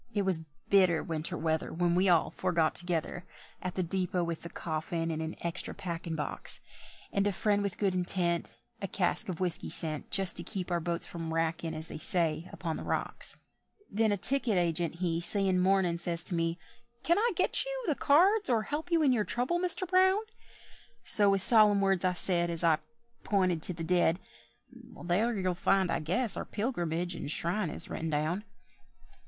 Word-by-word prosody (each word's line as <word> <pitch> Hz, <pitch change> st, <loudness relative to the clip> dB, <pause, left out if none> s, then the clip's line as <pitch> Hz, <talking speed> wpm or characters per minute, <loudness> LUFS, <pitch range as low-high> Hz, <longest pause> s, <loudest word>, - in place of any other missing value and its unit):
It 205 Hz, -, +1 dB
was 180 Hz, -4 st, +4 dB, 0.2 s
bitter 185 Hz, -5 st, +3 dB
winter 160 Hz, -1 st, -4 dB
weather 160 Hz, 0 st, -2 dB
When 175 Hz, 0 st, 0 dB
we 185 Hz, +2 st, +2 dB
all 170 Hz, -3 st, +2 dB
four 185 Hz, -1 st, -3 dB
got 160 Hz, -2 st, +2 dB
together 175 Hz, 0 st, -4 dB, 0.4 s
At 180 Hz, -1 st, -5 dB
the 185 Hz, -, -1 dB
depôt 180 Hz, 0 st, -2 dB
with 170 Hz, -1 st, -5 dB
the 170 Hz, -, -8 dB
coffin 165 Hz, +1 st, -4 dB
in 160 Hz, 0 st, -4 dB
an 160 Hz, 0 st, -5 dB
extra 170 Hz, +1 st, -4 dB
packin' 170 Hz, -2 st, -5 dB
box; 150 Hz, -, -4 dB, 0.5 s
And 200 Hz, 0 st, +1 dB
a -, -, +1 dB
friend 205 Hz, +2 st, 0 dB
with 200 Hz, -2 st, -3 dB
good 195 Hz, -3 st, 0 dB
intent, 175 Hz, -1 st, 0 dB, 0.2 s
A 195 Hz, -, -3 dB
cask 180 Hz, 0 st, -1 dB
of 175 Hz, -, -5 dB
whisky 180 Hz, -2 st, -1 dB
sent, 155 Hz, -3 st, -3 dB
Just 195 Hz, -3 st, +7 dB
to 175 Hz, -, +3 dB
keep 185 Hz, 0 st, -5 dB
our 175 Hz, -, +1 dB
boats 170 Hz, +1 st, -3 dB
from 165 Hz, -1 st, -6 dB
wrackin', 165 Hz, 0 st, -2 dB
as 160 Hz, +1 st, -5 dB
they -, -, -8 dB
say, 165 Hz, -1 st, +2 dB
upon 165 Hz, -3 st, -5 dB
the -, -, -7 dB
rocks. -, -, -2 dB, 0.5 s
Then 220 Hz, +1 st, +1 dB
a 205 Hz, -, 0 dB
ticket 245 Hz, -1 st, +1 dB
agent 170 Hz, -1 st, 0 dB
he 170 Hz, -1 st, -2 dB
Seein' 190 Hz, 0 st, +3 dB
mournin', 185 Hz, -2 st, +1 dB
says 170 Hz, -1 st, +2 dB
to 180 Hz, -, +3 dB
me, 165 Hz, 0 st, -1 dB, 0.5 s
"Can 340 Hz, +4 st, +2 dB
I 470 Hz, +2 st, +1 dB
get 365 Hz, -, +2 dB, 0.2 s
the 315 Hz, -, +1 dB
cards, 370 Hz, +10 st, +3 dB
or 225 Hz, -3 st, +1 dB
help 310 Hz, +8 st, -5 dB
you 330 Hz, -2 st, +3 dB
in 275 Hz, -, +4 dB
your 220 Hz, -4 st, +1 dB
trouble, 250 Hz, +11 st, -2 dB
Mister 360 Hz, +1 st, +3 dB
Brown?" 375 Hz, +2 st, +3 dB, 0.8 s
So 205 Hz, -1 st, +4 dB
with 195 Hz, -1 st, +7 dB
solemn 210 Hz, -3 st, +7 dB
words 195 Hz, -2 st, +1 dB
I 185 Hz, -1 st, +1 dB
said, 175 Hz, -1 st, +2 dB
As 170 Hz, 0 st, -3 dB
I 160 Hz, -2 st, +3 dB, 0.4 s
pinted 185 Hz, -5 st, 0 dB
to 180 Hz, -, -2 dB
the 165 Hz, -1 st, -7 dB
dead, 175 Hz, 0 st, +1 dB, 0.9 s
"There 210 Hz, +6 st, 0 dB
you'll 185 Hz, -1 st, -1 dB
find, 190 Hz, 0 st, +1 dB
I -, -, 0 dB
guess, 195 Hz, +9 st, -2 dB
our -, -, -4 dB
pilgrimage 175 Hz, -6 st, -3 dB
and 165 Hz, -, -6 dB
shrine 175 Hz, +4 st, -1 dB
is -, -, -5 dB
written 165 Hz, -, -5 dB
down." 155 Hz, +7 st, -2 dB
180 Hz, 190 wpm, -29 LUFS, 165-200 Hz, 0.9 s, Just